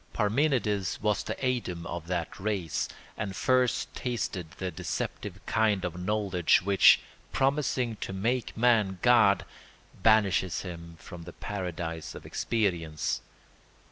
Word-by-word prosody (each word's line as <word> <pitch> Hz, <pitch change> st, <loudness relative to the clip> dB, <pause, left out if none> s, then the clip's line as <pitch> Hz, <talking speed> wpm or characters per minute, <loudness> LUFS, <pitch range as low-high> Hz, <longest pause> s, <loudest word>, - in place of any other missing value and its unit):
Parmenides 110 Hz, -3 st, +1 dB
was 105 Hz, -1 st, +2 dB
the -, -, -4 dB
Adam 95 Hz, -10 st, -1 dB
of 85 Hz, -2 st, -5 dB
that 85 Hz, -2 st, -3 dB
race, 95 Hz, -5 st, -1 dB, 0.3 s
and 100 Hz, -2 st, -4 dB
first 130 Hz, +1 st, +1 dB
tasted 110 Hz, -9 st, -3 dB
the 95 Hz, -1 st, -3 dB
deceptive -, -, -4 dB
kind 110 Hz, -4 st, +2 dB
of 90 Hz, -1 st, -4 dB
knowledge 95 Hz, -5 st, +2 dB
which, 100 Hz, 0 st, +6 dB, 0.3 s
promising 130 Hz, -4 st, +1 dB
to -, -, -5 dB
make 115 Hz, +6 st, -1 dB
man 110 Hz, -5 st, +3 dB
God, 115 Hz, -5 st, +5 dB, 0.6 s
banishes 100 Hz, -4 st, +3 dB
him 85 Hz, -2 st, -8 dB
from 85 Hz, -1 st, -10 dB
the 90 Hz, -, -9 dB
paradise 85 Hz, -4 st, -5 dB
of -, -, -10 dB
experience. 85 Hz, -9 st, -1 dB
100 Hz, 120 wpm, -29 LUFS, 90-115 Hz, 0.6 s, which